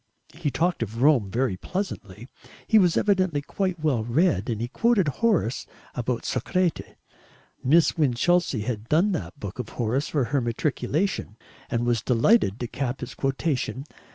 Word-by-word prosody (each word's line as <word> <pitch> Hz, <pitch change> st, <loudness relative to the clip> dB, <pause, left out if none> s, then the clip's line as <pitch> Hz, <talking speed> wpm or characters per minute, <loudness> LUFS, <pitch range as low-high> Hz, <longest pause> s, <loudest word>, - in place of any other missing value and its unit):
He 160 Hz, -2 st, -2 dB
talked 165 Hz, +4 st, 0 dB
of 115 Hz, +2 st, -2 dB
Rome 135 Hz, -9 st, +4 dB
very 115 Hz, -2 st, 0 dB
pleasantly; 120 Hz, -, -5 dB, 0.4 s
he 220 Hz, -, +5 dB
was 180 Hz, -4 st, +3 dB
evidently 185 Hz, -8 st, +1 dB
quite 185 Hz, +1 st, -2 dB
well 145 Hz, -8 st, +1 dB
read, 120 Hz, -, +1 dB
and 110 Hz, -3 st, -2 dB
he 120 Hz, -, -2 dB
quoted 215 Hz, -, +2 dB
Horace 145 Hz, -, 0 dB, 0.3 s
about 125 Hz, 0 st, -2 dB
Soracte. 185 Hz, -3 st, -1 dB, 0.7 s
Miss 160 Hz, +5 st, +3 dB
Winchelsea 150 Hz, 0 st, +2 dB
had 110 Hz, 0 st, -4 dB
"done" 175 Hz, +7 st, +3 dB
that 90 Hz, -, -4 dB
book 100 Hz, +4 st, -7 dB
of 120 Hz, -3 st, -4 dB
Horace 125 Hz, +5 st, 0 dB
for 145 Hz, -4 st, 0 dB
her 135 Hz, +3 st, 0 dB
matriculation, 125 Hz, -, -1 dB, 0.3 s
and 120 Hz, 0 st, 0 dB
was 120 Hz, -2 st, +1 dB
delighted 120 Hz, -, +3 dB
to 120 Hz, -, -2 dB
cap 130 Hz, +1 st, -3 dB
his 125 Hz, -, -6 dB
quotation. 135 Hz, -1 st, -2 dB
135 Hz, 155 wpm, -25 LUFS, 115-170 Hz, 0.7 s, he